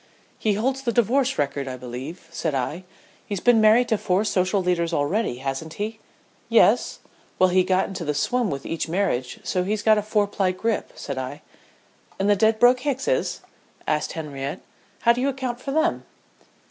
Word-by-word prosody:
"He 215 - +1
holds 260 +6 -1
the 245 -3 -1
divorce 250 +4 +2
record 140 -1 -1
I 130 -1 -5
believe," 130 +8 -8
said 160 -3 -2
I. 150 +8 -3 0.4
"He's 200 -2 -3
been 235 +2 +4
married 220 +3 +5
to 220 - +1
four 185 +3 +1
social 195 -1 +1
leaders 175 -2 0
already, 160 - 0
hasn't 135 +4 -4
he?" 220 +2 -4 0.5
"Yes - - +3 0.2
" - - -33
"Well, 185 - +4
he 185 +1 +4
got 185 +1 +1
into 190 -3 -6
the 150 -2 -2
swim 240 - +1
with 140 -3 -4
each 165 0 -3
marriage 165 -9 -1
so 180 - 0
he's 205 +2 -2
got 215 -1 +5
a - - -1
four 210 0 +1
ply 195 -2 0
grip," 225 +4 -2
said 140 -2 -5
I. 130 +3 -6 0.7
"And 195 - 0
the 205 - +5
Dedbroke 225 +5 +4
Hickses?" 285 - -1 0.4
asked 150 0 -1
Henriette. 145 -3 -5 0.4
"How 235 - +5
do 245 - -3
you 275 - +2
account 255 -3 -3
for 275 - -6
them?" 315 +4 +1
195 Hz, 185 wpm, -24 LUFS, 155-230 Hz, 0.7 s, married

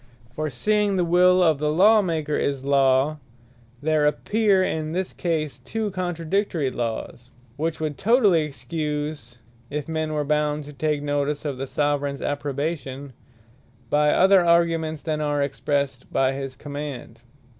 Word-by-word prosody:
For 155 +2 -2
seeing 205 - +1
the 180 -2 +1
will 180 +1 +5
of 160 -4 +3
the 150 0 0
Law 210 +7 +5
maker 160 -5 -1
is 140 -2 -1
a - - -7
Law, 140 +2 +3 0.6
there 155 -1 +3
appear 200 +4 +2
in 155 -3 -2
this 185 +1 -2
case 155 -4 -2
two 220 -2 -3
contradictory 175 -4 -1
Lawes; 120 +1 -5 0.3
which 160 +3 -2
would 155 -2 -3
totally 210 -7 +4
Excuse, 150 -2 -4 0.3
if 145 -1 -4
men 160 -1 -2
were 150 -1 0
bound 150 0 0
to 150 +1 -11
take 150 +1 -1
notice 145 +1 -1
of 140 -3 -3
the 135 - -3
Soveraigns 145 -1 -1
approbation, 145 -1 -3 0.8
by 150 0 +3
other 190 +3 +5
arguments, 165 -2 +2
than 155 -2 -2
are 145 -1 0
expressed 140 -1 -2
by 135 0 +2
his 135 -1 -5
command. 145 -4 -7
150 Hz, 145 wpm, -24 LUFS, 140-170 Hz, 0.8 s, will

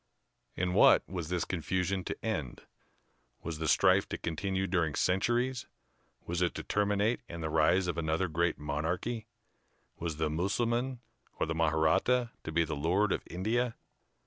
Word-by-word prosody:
In 90 0 -1
what - - +6
was 85 -3 -5
this 90 -2 -1
confusion 95 +2 -1
to - - -5
end? 75 - -3 0.8
Was 80 -2 -4
the 80 - -2
strife - - +4
to - - -3
continue 95 +3 -2
during 85 -5 0
centuries? 120 +7 +1 0.6
Was 85 +1 -2
it 90 - +1
to - - -4
terminate 105 +2 +1
in 85 0 -6
the 80 -1 -3
rise 80 +4 +3
of 85 -2 -2
another 80 +3 0
great 85 +1 0
monarchy? 85 +10 -3 0.7
Was 80 -3 -3
the 80 0 +1
Mussulman 120 +9 -1 0.4
or - - +2
the 80 - -2
Mahratta 80 +10 +2
to - - -5
be 85 +1 +3
the 80 -1 -3
Lord 90 +8 +1
of - - 0
India? 115 +6 -1
90 Hz, 155 wpm, -31 LUFS, 80-105 Hz, 0.8 s, what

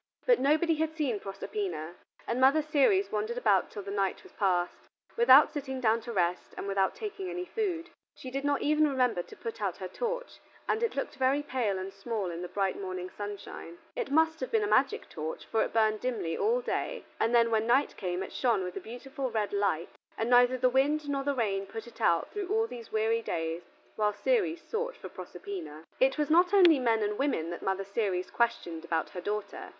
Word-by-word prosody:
But - - +5
nobody 310 +4 +3
had 315 0 -1
seen 270 -9 0
Proserpina, 195 - -4 0.3
and 240 +2 -1
Mother 280 +4 +5
Ceres 310 +7 +3
wandered 215 +3 -2
about 205 -6 +3
till 205 - -7
the 200 - -6
night 195 -1 -1
was - - -15
passed, 180 -3 0 0.3
without 470 +1 +7
sitting 265 -3 -4
down 230 -2 +2
to 235 - -7
rest, 180 -4 -1
and - - -4
without 195 -1 +1
taking 400 -3 -5
any 360 0 -4
food. 355 -6 -3 0.2
She 255 - -8
did 275 +1 -3
not 285 -1 +1
even 305 +1 +4
remember 250 -8 +1
to - - -13
put 230 -1 -7
out 195 -4 -1
her 185 - -5
torch, - - -4 0.3
and 435 - +1
it 465 - 0
looked 275 - -3
very 270 +2 +2
pale 235 -8 -1
and 190 +1 -5
small 195 -2 -3
in 170 +1 -5
the 180 - -4
bright 195 +1 -1
morning 185 -1 -5
sunshine. 205 -4 -7 0.2
It - - -2
must 320 +2 +3
have - - -3
been 445 -2 +2
a - - 0
magic 275 -7 +2
torch, 160 -1 -6
for 225 - 0
it - - -3
burned 215 -1 +2
dimly 230 -10 -2
all 470 +4 +1
day, - - -3
and 235 +2 +2
then 230 -1 +4
when 220 0 +2
night 265 +4 +3
came 180 0 -3
it - - -9
shone 235 -7 +1
with 180 0 -5
a - - -3
beautiful 265 +3 -5
red 215 -3 -1
light, 200 -5 0 0.3
and 225 +2 -1
neither 245 +1 +6
the 255 - +3
wind 290 +4 +2
nor 275 -1 -1
the 285 0 0
rain 200 -5 -1
put 225 +3 -7
it 235 0 -13
out 170 -6 +2
through 410 -3 -4
all 445 +3 +2
these 240 - -9
weary 220 +1 +1
days 165 -4 -3 0.4
while 210 -1 +2
Ceres 345 - 0
sought 485 +2 -3
for - - -9
Proserpina. 355 - -8 0.2
It 265 +2 +3
was 300 0 0
not 355 +4 +5
only 345 -7 +7
men 225 -3 +2
and 210 0 -2
women 220 - 0
that 175 - -6
Mother 195 0 -1
Ceres 195 -3 -1
questioned 205 -9 -1
about 165 -1 -1
her 180 - -6
daughter. 210 +2 -4
235 Hz, 215 wpm, -30 LUFS, 195-305 Hz, 0.4 s, without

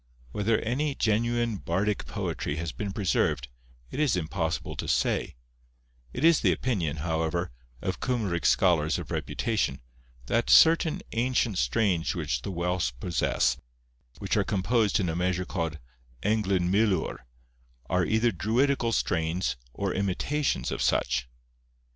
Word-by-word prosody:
Whether 105 - +1
any 140 +5 -1
genuine 115 0 +1
bardic 100 +4 -1
poetry 75 - -3
has 85 0 -3
been 100 -2 -4
preserved, 95 - 0 0.4
it - - -5
is 150 -8 +3
impossible 80 -1 -2
to - - -4
say; - - 0 0.8
it 130 - -5
is 165 -1 +6
the - - +3
opinion, 85 - -1
however, 80 +1 -1 0.3
of 95 - -2
Cymric 105 -10 0
scholars 85 -6 +3
of - - -7
reputation, 110 - -1 0.5
that 115 - 0
certain 160 -1 +5
ancient 120 -3 +1
strains 85 - +1
which 75 -8 -2
the - - -5
Welsh 85 -7 -1
possess, 65 -7 +1 0.6
which 95 - -2
are 105 - +3
composed 110 +1 +1
in 95 - 0
a 80 - -2
measure 90 +1 0
called 85 -5 -3 0.5
Englyn 100 -4 +1
milwr, 100 -4 +1 0.7
are 90 0 +1
either 110 +5 +2
druidical 115 - +1
strains 85 - 0 0.2
or 100 +6 -2
imitations 115 +10 -1
of - - -3
such. - - +1
95 Hz, 130 wpm, -27 LUFS, 85-115 Hz, 0.8 s, is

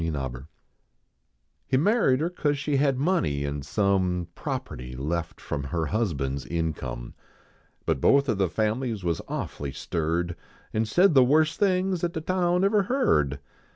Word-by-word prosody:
V 80 - -1
HIZ 80 - -2
N 65 -1 -5 1.2
He 130 - +2
maird 155 - +3
her 170 +2 0
cause 145 -5 0
she 145 0 0
had 135 -2 +2
money 135 - +1
an 70 0 -2
1 - - -6
some 90 +3 +1
Property 120 - -5
left 80 +6 -3
from 70 -1 -4
er 85 -2 0
husband 75 - -1
s 70 - -7
income; 75 -8 -3 0.7
Hut 65 - +1
both 140 0 +4
of 110 -5 0
the 95 -3 +2
families 110 +1 -1
was 85 -2 -1
awfully 70 -2 -4
stirred, 85 +4 -2 0.4
An 110 +1 +1
said 175 - +4
the 135 -2 +7
worst 155 +5 +3
things 185 -2 +1
at 170 0 0
the 160 - -3
town 180 +1 +1
ever 200 +1 +4
heard. 185 - +1
110 Hz, 165 wpm, -26 LUFS, -, 1.2 s, the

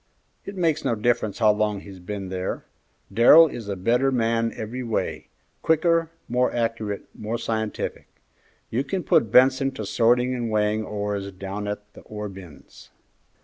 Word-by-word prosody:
"It 200 - -7
makes 165 -5 +1
no 115 - +1
difference 110 -2 0
how 110 -2 +5
long 105 -1 -1
he's 95 -2 -11
been 95 +1 -6
there. 95 0 -4 0.5
Darrell 120 +10 +8
is 120 -9 -6
a 100 - -2
better 120 +8 +2
man 115 -2 +1
every 115 +4 -5
way, 115 -3 -3 0.3
quicker, 165 0 +2 0.2
more 125 +1 +1
accurate, 115 -3 -2
more 110 +2 -4
scientific. 110 -2 -3 0.6
You 125 +4 0
can 180 +6 -3
put 110 - +3
Benson 130 +1 +5
to 110 -5 -5
sorting 125 +4 +2
and 120 -2 -2
weighing 105 0 +1
ores 105 -2 -3
down 100 +2 -6
at 105 0 -6
the - - -13
ore 105 -1 -6
bins." 95 -6 -13
110 Hz, 155 wpm, -24 LUFS, 105-125 Hz, 0.6 s, Darrell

